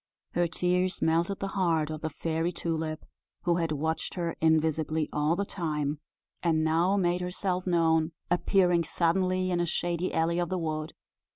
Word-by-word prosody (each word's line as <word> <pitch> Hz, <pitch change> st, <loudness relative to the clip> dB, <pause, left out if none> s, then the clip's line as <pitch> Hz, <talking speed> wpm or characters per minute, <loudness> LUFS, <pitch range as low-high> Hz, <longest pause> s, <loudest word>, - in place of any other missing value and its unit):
Her 175 Hz, 0 st, +1 dB
tears 180 Hz, +1 st, 0 dB
melted 170 Hz, +4 st, +1 dB
the 195 Hz, -, -2 dB
heart 165 Hz, -6 st, +1 dB
of 155 Hz, 0 st, -5 dB
the 160 Hz, -, -2 dB
Fairy 165 Hz, +2 st, -1 dB
Tulip, 160 Hz, -2 st, -3 dB, 0.4 s
who 175 Hz, -1 st, +2 dB
had 165 Hz, -2 st, 0 dB
watched 160 Hz, +2 st, -2 dB
her 170 Hz, -2 st, -2 dB
invisibly 160 Hz, -1 st, +2 dB
all 150 Hz, +2 st, +2 dB
the 200 Hz, +2 st, -1 dB
time, 150 Hz, -6 st, -2 dB, 0.4 s
and 160 Hz, -2 st, +2 dB
now 170 Hz, +5 st, +2 dB
made 175 Hz, -1 st, +1 dB
herself 180 Hz, 0 st, -2 dB
known 160 Hz, -2 st, +3 dB, 0.2 s
appearing 175 Hz, -1 st, +3 dB
suddenly 185 Hz, +3 st, +1 dB
in 175 Hz, -, +1 dB
a 175 Hz, -, +1 dB
shady 175 Hz, +2 st, -1 dB
alley 165 Hz, +1 st, +1 dB
of 175 Hz, -, -1 dB
the 185 Hz, -, -1 dB
wood. 155 Hz, -2 st, -3 dB
170 Hz, 165 wpm, -29 LUFS, 160-180 Hz, 0.4 s, known